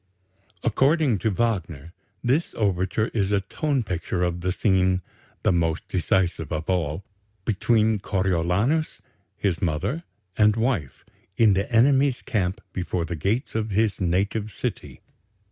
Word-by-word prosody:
According 135 - +2
to 110 - +1
Wagner, 90 -8 -2 0.3
this 135 +8 +1
overture 100 +1 0
is 100 -3 -1
a 100 -1 +2
tone 135 +6 -1
picture 90 -2 -2
of 90 0 -1
the 90 +1 0
scene 95 -2 +2 0.4
"the - - +4
most 85 -2 0
decisive 90 -2 0
of 80 0 -3
all" 85 -1 -1 0.4
between 110 0 +2
Coriolanus, 95 - 0 0.4
his 95 -5 -1
mother, 90 - -1 0.3
and 105 -1 +4
wife, 115 - -1 0.3
in 110 -3 +5
the 100 +4 -1
enemy's 135 +3 +3
camp 100 0 -1
before 90 -2 -2
the 85 - -4
gates 105 - -1
of 110 -1 -1
his 105 -1 +1
native 100 +4 0
city. - - -5
100 Hz, 130 wpm, -24 LUFS, 90-115 Hz, 0.4 s, in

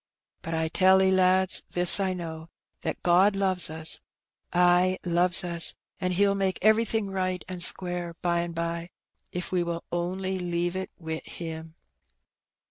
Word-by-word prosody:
But 165 0 -4
I 160 0 0
tell 190 +3 +4
*e, 190 - +3
lads, 185 0 +3
this 180 +2 +6
I 190 -1 -1
know, 160 -2 -7 0.3
that - - -5
God 185 +3 +4
loves 190 -4 -1
ns, 160 0 +1 0.5
ay, 180 +1 +3
loves 175 +1 +2
us, 170 -1 +2 0.2
and 185 -1 -1
He'll 200 +2 +2
make 195 -1 -1
everything 220 -1 +2
right 185 -1 -2
and 185 -1 -6
square 175 -1 +1
by 170 -1 +1
and 170 0 -4
bye, 170 +1 -3 0.4
if 180 +1 -5
we 180 -1 +1
will 170 -1 -4
only 185 +2 -3
leave 175 0 -2
it 190 0 -4
wi' 160 -1 -5
Him." 160 -1 -8
180 Hz, 155 wpm, -26 LUFS, 170-190 Hz, 0.5 s, this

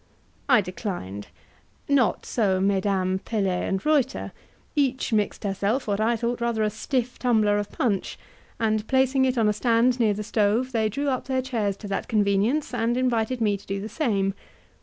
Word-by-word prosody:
I 250 -5 +6
declined. 175 - -5 0.6
Not 275 -5 +2
so 195 -5 +1
Mesdames 190 -1 +1
Pelet 195 -5 -1
and 195 +1 -2
Reuter; 285 -4 +1 0.4
each 265 -4 0
mixed 210 0 0
herself 205 +6 -1
what 200 -1 0
I 230 +2 +2
thought 235 +1 -2
rather 235 -2 0
a 210 - +1
stiff 245 +3 -2
tumbler 215 -4 +2
of 205 - -5
punch, 205 -7 -1 0.4
and 220 -1 0
placing 265 0 +3
it 255 -1 0
on 225 -2 +3
a 210 - +3
stand 240 +3 +2
near 215 -3 +3
the 210 - -4
stove, 220 +4 +1
they 220 -3 +1
drew 280 +7 -2
up 255 -2 -2
their 260 -1 -1
chairs 220 -7 -1
to 210 - -8
that 195 - -2
convenience, 215 +7 +1
and 240 0 0
invited 245 -1 0
me 210 -2 +2
to 200 - -19
do 195 0 -2
the 210 +3 -6
same. 205 -7 0
220 Hz, 180 wpm, -25 LUFS, 200-250 Hz, 0.6 s, I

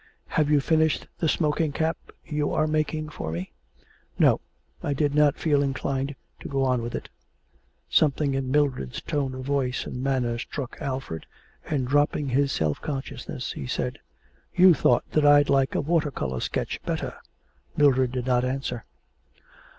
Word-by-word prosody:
'Have 150 -1 +1
you 150 -1 +5
finished 160 +1 +2
the 160 - +1
smoking 155 -1 +1
cap 160 +3 0 0.3
you 150 -2 -1
are 155 - +2
making 155 0 -1
for 80 - -5
me?' 85 +3 -5 0.7
'No; - - +4 0.4
I 145 - -1
did 145 0 +1
not 150 -1 +4
feel 145 -3 +2
inclined 135 0 -1 0.2
to - - -7
go 135 -1 0
on 125 -2 +2
with 120 +1 -4
it.' - - -5 0.8
Something 145 -1 +2
in 135 -1 -1
Mildred's 135 - 0
tone 135 -3 -2
of 130 0 -6
voice 135 -2 0
and 125 - -5
manner 125 -4 0
struck 130 +1 -6
Alfred, 130 - -4 0.4
and, 135 -5 0
dropping 145 +1 +2
his 140 +2 +2
self 75 -2 -1
consciousness, 135 -3 -5
he 65 - -6
said: - - -2 0.6
'You 180 0 +8
thought 125 -4 +2
that 155 - +2
I'd 145 0 +6
like 135 -1 +2
a - - +2
water 155 0 +1
colour 65 - -3
sketch - - -2
better.' - - -3 0.6
Mildred 130 -4 +4
did 125 -1 -3
not 125 -1 +2
answer. 130 -2 -3
140 Hz, 160 wpm, -26 LUFS, 130-150 Hz, 0.8 s, You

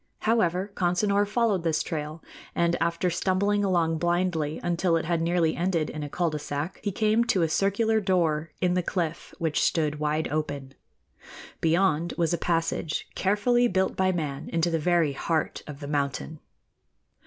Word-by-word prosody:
However, 200 -3 +1
Consinor 200 +3 +1
followed 215 -4 +1
this 165 -2 0
trail, 155 0 -5 0.3
and 170 0 +2
after 170 +2 +1
stumbling 200 +4 +1
along 170 -4 +1
blindly 175 -3 0
until 175 0 +1
it 165 - -3
had 170 0 0
nearly 170 -1 +1
ended 170 -3 0
in 155 - -6
a 145 - -4
cul 170 +2 0
de 150 - -3
sac, 145 +3 -4
he 205 - -1
came 215 +3 +2
to 190 -7 +2
a - - +3
circular 200 +6 +2
door 165 -5 +1
in 180 -1 +2
the 180 - +2
cliff 170 -2 -3
which 160 -2 0
stood 150 -2 +1
wide 150 +1 0
open. 145 -3 -3 0.9
Beyond 165 0 +2
was 170 -1 +1
a 170 - 0
passage 165 -2 -1
carefully 240 +6 +2
built 190 -3 0
by 190 0 +2
man 150 -6 -3
into 170 +1 0
the 165 - +1
very 165 -2 +2
heart 160 +3 -1
of 150 -1 -9
the 145 - -5
mountain. 145 +1 -2
170 Hz, 165 wpm, -26 LUFS, 155-190 Hz, 0.9 s, a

